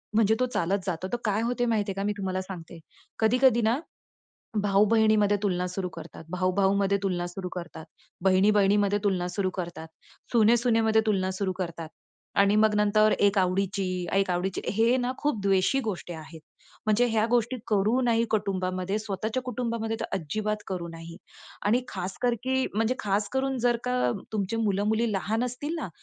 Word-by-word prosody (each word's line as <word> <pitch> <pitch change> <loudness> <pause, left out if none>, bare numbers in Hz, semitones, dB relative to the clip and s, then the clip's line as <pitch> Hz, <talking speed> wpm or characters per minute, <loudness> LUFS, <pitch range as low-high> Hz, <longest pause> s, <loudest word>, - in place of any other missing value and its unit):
म्हणजे 220 0 +4
तो 255 - +3
चालत 190 +4 +1
जातो. 185 -1 -3
तर - - +2
काय 210 0 +1
होत 245 +1 -1
माहिती 210 -3 0
आहे - - -4
का, 195 - -2
मी 210 - +1
तुम्हाला 185 -1 -2
सांगते. 175 -3 -9 0.4
कधी-कधी 240 +2 +4
ना 230 +4 +2 0.8
भाऊ-बहिणीमध्ये 210 +1 +4
तुलना 180 -3 0
सुरू 185 0 -3
करतात, - - -10
भाऊ-भाऊमध्ये 195 +2 +1
तुलना 180 -3 -1
सुरू 180 +1 -6
करतात, 170 -2 -7 0.4
बहिणी-बहिणीमध्ये 200 +1 +4
तुलना 185 -3 +1
सुरू 185 +1 -1
करतात, 170 -2 -7 0.4
सुने-सुनेमध्ये 225 -1 +4
तुलना 190 -3 +1
सुरू 190 0 -2
करतात 170 -3 -4 0.5
आणि 200 +1 +4
मग 215 0 +4
नंतर 210 +1 +4
एक 200 0 +3
आवडीची 185 -1 0
एक 195 0 +2
आवडीची 180 +1 -1
हे 230 +4 +3
ना 250 0 -1
खूप 290 -8 -1
द्वेषी 195 +7 +2
गोष्टी 180 -2 -6
आहेत. 160 0 -10 0.5
म्हणजे 215 +3 +3
ह्या 220 -1 +2
गोष्टी 240 +1 +1
करू 215 +4 +2
नाही 230 -2 +2
कुटुंबामध्ये, 190 -2 -1
स्वतःच्या 215 +4 -3
कुटुंबामध्ये 230 -2 -3
तर - - -2
अजिबात 210 +6 -2
करू 180 -3 -4
नाही. 165 0 -9 0.5
आणि 230 +4 +3
खासकर 195 +6 -2
की 260 0 +1
म्हणजे 225 +4 +1
खास 205 0 0
करून 265 0 0
जर 240 0 +2
का 250 0 0 0.4
तुमचे 210 0 -1
मुलं-मुली 215 +1 +1
लहान 215 +4 -1
असतील 250 +6 -4
ना, 315 - -4
205 Hz, 160 wpm, -27 LUFS, 185-225 Hz, 0.8 s, म्हणजे